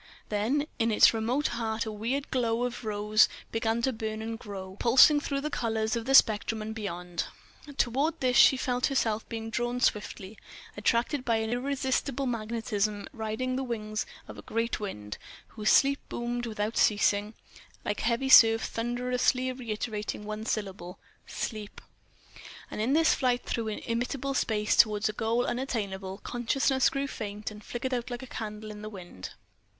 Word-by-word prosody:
Then 230 Hz, +8 st, 0 dB
in 230 Hz, 0 st, +2 dB
its 215 Hz, -, +6 dB
remote 235 Hz, +6 st, 0 dB
heart 225 Hz, -1 st, -2 dB
a 220 Hz, -, -4 dB
weird 240 Hz, +7 st, -3 dB
glow 235 Hz, -2 st, +1 dB
of 245 Hz, -1 st, -3 dB
rose 210 Hz, 0 st, +3 dB, 0.2 s
began 225 Hz, 0 st, 0 dB
to 265 Hz, -, +1 dB
burn 220 Hz, -1 st, -4 dB
and 225 Hz, 0 st, -5 dB
grow, 190 Hz, -4 st, -8 dB
pulsing 265 Hz, +5 st, +7 dB
through 280 Hz, -1 st, -3 dB
all -, -, -1 dB
the 300 Hz, -, -2 dB
colours 220 Hz, -3 st, -1 dB
of 230 Hz, -1 st, -3 dB
the 270 Hz, +1 st, +3 dB
spectrum 220 Hz, -1 st, +5 dB
and 215 Hz, +1 st, -5 dB
beyond. 180 Hz, -5 st, -4 dB, 0.5 s
Toward 280 Hz, +7 st, +1 dB
this 250 Hz, -1 st, +1 dB
she 265 Hz, -, +7 dB
felt 250 Hz, -1 st, 0 dB
herself 225 Hz, -5 st, 0 dB
being 225 Hz, 0 st, -5 dB
drawn 240 Hz, +1 st, -1 dB
swiftly, 210 Hz, -3 st, -1 dB, 0.4 s
attracted 235 Hz, +6 st, +1 dB
by 235 Hz, -3 st, +1 dB
an 220 Hz, 0 st, -1 dB
irresistible 265 Hz, +1 st, -1 dB
magnetism, 215 Hz, -3 st, -2 dB
riding 225 Hz, +2 st, -2 dB
the 265 Hz, -, -1 dB
wings 215 Hz, -3 st, -3 dB, 0.2 s
of -, -, -9 dB
a -, -, -7 dB
great 230 Hz, +1 st, -2 dB
wind, 105 Hz, -, -6 dB, 0.3 s
whose 215 Hz, +3 st, +4 dB
voice 275 Hz, +1 st, 0 dB
boomed 240 Hz, 0 st, -3 dB
without 215 Hz, 0 st, -3 dB
ceasing, 205 Hz, 0 st, +2 dB, 0.5 s
like 205 Hz, -, -2 dB
a -, -, -3 dB
heavy 235 Hz, +3 st, +1 dB
surf 225 Hz, -3 st, +8 dB
thunderously 250 Hz, +2 st, 0 dB
reiterating 215 Hz, -4 st, -4 dB
one 215 Hz, +1 st, -5 dB
syllable, 190 Hz, -5 st, -4 dB, 0.3 s
"Sleep!"... 215 Hz, -3 st, -5 dB, 0.9 s
And -, -, -3 dB
in 245 Hz, +5 st, +1 dB
this 320 Hz, +1 st, +5 dB
flight 250 Hz, -2 st, +1 dB
through 230 Hz, -2 st, -2 dB
illimitable 245 Hz, +5 st, -2 dB
space 215 Hz, -5 st, +1 dB
toward 210 Hz, -1 st, +4 dB
a -, -, -3 dB
goal 230 Hz, +3 st, 0 dB
unattainable, 200 Hz, -6 st, -3 dB
consciousness 265 Hz, +2 st, +1 dB
grew 275 Hz, 0 st, -2 dB
faint 210 Hz, -5 st, -5 dB
and 210 Hz, 0 st, -11 dB
flickered 255 Hz, +4 st, -4 dB
out 245 Hz, 0 st, -2 dB
like 245 Hz, +1 st, -5 dB
a -, -, -6 dB
candle 215 Hz, -3 st, -6 dB
in 210 Hz, 0 st, -9 dB
the 215 Hz, -, -6 dB
wind. 175 Hz, -, -9 dB
225 Hz, 165 wpm, -29 LUFS, 215-250 Hz, 0.9 s, surf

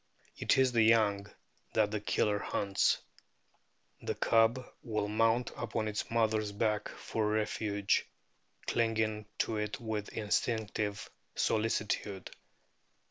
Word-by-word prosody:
It -, -, +2 dB
is 130 Hz, -1 st, +4 dB
the 115 Hz, -2 st, +3 dB
young 110 Hz, -3 st, +4 dB, 0.5 s
that 105 Hz, -2 st, +2 dB
the 105 Hz, -1 st, -2 dB
Killer 105 Hz, 0 st, +1 dB
hunts. 100 Hz, -1 st, +1 dB, 1.0 s
"The -, -, -3 dB
cub 115 Hz, +3 st, +3 dB, 0.2 s
will 105 Hz, -4 st, -2 dB
mount 115 Hz, +3 st, +2 dB
upon 110 Hz, -1 st, -2 dB
its 105 Hz, 0 st, -3 dB
mother's 110 Hz, -2 st, +1 dB
back 105 Hz, 0 st, 0 dB
for 110 Hz, -2 st, -2 dB
refuge, 105 Hz, -1 st, 0 dB, 0.6 s
clinging 110 Hz, -2 st, 0 dB
to 110 Hz, -, 0 dB
it 105 Hz, +5 st, -3 dB
with 110 Hz, -3 st, -3 dB
instinctive 105 Hz, -1 st, -1 dB, 0.3 s
solici 110 Hz, -1 st, +1 dB
tude. 100 Hz, -2 st, -3 dB
110 Hz, 115 wpm, -32 LUFS, 105-115 Hz, 1.0 s, is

